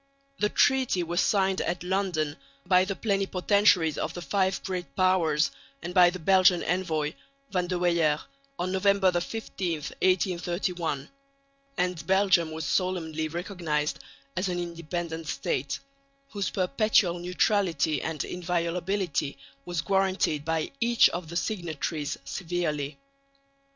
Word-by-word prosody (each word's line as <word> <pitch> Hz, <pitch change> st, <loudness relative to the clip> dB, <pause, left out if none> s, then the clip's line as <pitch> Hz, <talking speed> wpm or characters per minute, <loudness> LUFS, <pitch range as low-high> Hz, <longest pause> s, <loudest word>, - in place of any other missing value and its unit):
The 210 Hz, -, +2 dB
treaty 260 Hz, -10 st, +3 dB
was 175 Hz, +2 st, 0 dB
signed 190 Hz, -2 st, +2 dB
at 175 Hz, 0 st, -2 dB
London 180 Hz, -5 st, -1 dB, 0.3 s
by 185 Hz, 0 st, +4 dB
the 195 Hz, 0 st, -3 dB
plenipotentiaries 195 Hz, -4 st, +2 dB
of -, -, -3 dB
the 175 Hz, -, -5 dB
Five 190 Hz, +4 st, 0 dB
Great 180 Hz, -2 st, -5 dB
Powers 175 Hz, -5 st, +3 dB, 0.3 s
and 175 Hz, +1 st, -5 dB
by 180 Hz, -1 st, +7 dB
the 180 Hz, -, -5 dB
Belgian 185 Hz, 0 st, +4 dB
envoy, 160 Hz, -4 st, -1 dB, 0.4 s
Van 180 Hz, -2 st, 0 dB
de 180 Hz, 0 st, -1 dB
Weyer, 170 Hz, -4 st, +2 dB, 0.4 s
on 185 Hz, +1 st, -2 dB
November 190 Hz, 0 st, +3 dB
15, 180 Hz, 0 st, -3 dB
1831; 175 Hz, -1 st, -1 dB, 0.7 s
and 180 Hz, -4 st, -1 dB
Belgium 190 Hz, -4 st, +4 dB
was 160 Hz, -1 st, -5 dB
solemnly 160 Hz, -3 st, -1 dB
recognised 165 Hz, -3 st, -2 dB, 0.4 s
as 185 Hz, +1 st, -1 dB
an 175 Hz, -, -2 dB
independent 170 Hz, -1 st, -4 dB
State, 140 Hz, -2 st, -2 dB, 0.5 s
whose 200 Hz, -2 st, -2 dB
perpetual 190 Hz, -3 st, +2 dB
neutrality 175 Hz, -, +1 dB
and 160 Hz, -3 st, -3 dB
inviolability 175 Hz, -2 st, -1 dB, 0.3 s
was 175 Hz, -2 st, -2 dB
guaranteed 190 Hz, -5 st, +1 dB
by 160 Hz, 0 st, -1 dB
each 235 Hz, 0 st, +5 dB
of 175 Hz, -2 st, -5 dB
the 170 Hz, -, -7 dB
signatories 160 Hz, -7 st, -3 dB
severally. 160 Hz, -5 st, -2 dB
175 Hz, 120 wpm, -27 LUFS, 160-190 Hz, 0.7 s, by